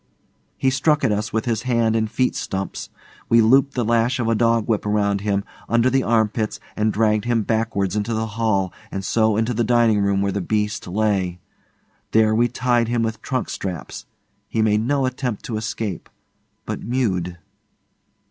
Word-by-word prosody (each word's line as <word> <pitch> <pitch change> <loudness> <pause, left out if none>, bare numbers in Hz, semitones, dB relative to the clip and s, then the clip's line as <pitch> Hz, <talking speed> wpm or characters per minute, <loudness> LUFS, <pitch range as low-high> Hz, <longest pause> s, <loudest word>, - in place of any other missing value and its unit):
He 130 - +2
struck 145 +3 +2
at 125 - +3
us 105 +2 -1
with 110 0 -1
his 115 -3 0
hand 115 -2 +1
and 110 -1 0
feet 125 +3 0
stumps. 95 0 -4 0.4
We 115 - +5
looped 135 +5 +4
the 120 -3 0
lash 115 +2 +2
of 120 - 0
a 115 - +3
dog 115 -1 +2
whip 110 -3 0
round 100 -1 +1
him, 100 -1 0 0.3
under 120 +2 +3
the 135 +1 +3
armpits, 110 -2 0 0.2
and 110 0 +1
dragged 105 0 +1
him 120 -2 +1
backwards 105 -3 -1
into 105 +2 -1
the 110 +1 -1
hall 105 -4 0 0.2
and 95 -1 -5
so 110 -1 +2
into 115 +2 0
the 120 +1 0
dining 115 -2 +3
room 100 -1 +1
where 100 - 0
the 100 - -2
beast 105 +2 -1
lay. 95 -2 0 0.7
There 110 -1 +4
we 120 +2 +3
tied 120 -1 +1
him 120 0 0
with 115 0 -3
trunk 130 -3 -2
straps. 90 -5 -6 0.4
He 110 - 0
made 105 0 +2
no 135 +3 +1
attempt 125 -3 -3
to 110 - -3
escape, 110 -4 -4 0.6
but - - -4
mewed. 95 -8 -1
110 Hz, 180 wpm, -22 LUFS, 105-120 Hz, 0.7 s, We